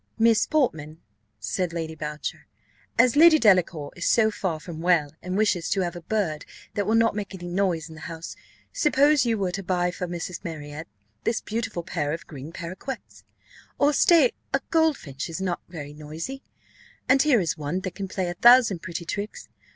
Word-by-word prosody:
"Miss 230 -1 +4
Portman," 160 - 0 0.4
said 170 - -2
Lady 165 -1 -3
Boucher, 150 -1 -6 0.5
"as 245 +1 +5
Lady 320 +1 +8
Delacour 180 - +3
is 170 - -2
so 220 -2 +4
far 180 -6 -2
from 160 0 -8
well, 165 -4 +2
and 180 +2 -3
wishes 190 -6 +1
to 195 - +1
have 175 -1 -2
a 175 - -7
bird 170 -5 -1 0.3
that 205 -1 -1
will 220 - +3
not 230 0 +4
make 205 -2 -4
any 175 -1 -8
noise 175 -3 0
in 160 - -11
the 160 - -12
house, 165 +1 -7 0.4
suppose 295 - +3
you 225 -1 +1
were 190 -3 -1
to 195 - -4
buy 180 -1 0
for 180 0 -4
Mrs. 175 +1 -5
Marriott 155 -2 -7 0.4
this 230 - 0
beautiful 220 -5 -4
pair 150 -4 -2
of 165 - -6
green 145 0 -9
parroquets; 185 +10 -7 0.5
or, 290 +1 +3
stay, 305 -3 +5 0.2
a 270 - 0
goldfinch 285 - 0
is 165 - -5
not 185 -2 -2
very 150 -4 -8
noisy, 155 - -7 0.7
and 265 +1 +5
here 285 -6 +4
is 170 -5 0
one 155 +4 -3
that 185 -1 -5
can 195 -1 -5
play 185 -1 -2
a 175 - -2
thousand 240 -2 +6
pretty 170 -1 -5
tricks. 205 - -5
180 Hz, 185 wpm, -25 LUFS, 165-225 Hz, 0.7 s, Lady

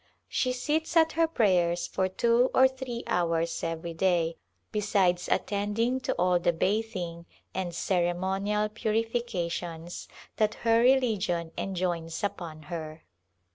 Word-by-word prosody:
She 255 - 0
sits 305 +6 0
at 320 0 +5
her 330 0 +2
prayers 180 - +2
for 190 - 0
two 235 +6 +3
or 260 - +7
three 260 -2 -6
hours 170 -1 0
every 165 0 -3
day, 170 -1 +1 0.3
besides 200 -4 +1
attending 210 +5 0
to 260 - -1
all 180 0 +3
the 175 - +2
bathing 185 -3 -2 0.3
and 185 -2 -2
ceremonial 190 +4 0
purifications 210 -7 -2 0.3
that 215 -1 +2
her 230 0 +5
religion 215 -10 +2
enjoins 175 -3 -2
upon 165 -6 -4
her. 155 0 -7
190 Hz, 120 wpm, -28 LUFS, 170-230 Hz, 0.3 s, or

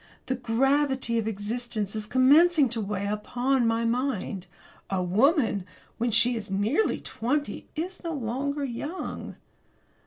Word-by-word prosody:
The 260 - -1
gravity 260 0 +1
of 220 - -2
existence 220 0 -3
is 215 -1 -3
commencing 285 +4 +5
to 230 -1 -2
weigh 200 -1 -3
upon 245 +5 0
my 225 +1 +1
mind. 230 -6 -2 0.4
A 190 -2 0
woman 220 - +2 0.4
when 240 +1 +1
she 235 +2 +4
is 215 -3 -5
nearly 210 - +1
twenty 285 +6 -2
is 360 +5 -4
no 335 - -3
longer 280 +3 -2
young. 290 +8 -5
240 Hz, 130 wpm, -27 LUFS, 215-275 Hz, 0.4 s, commencing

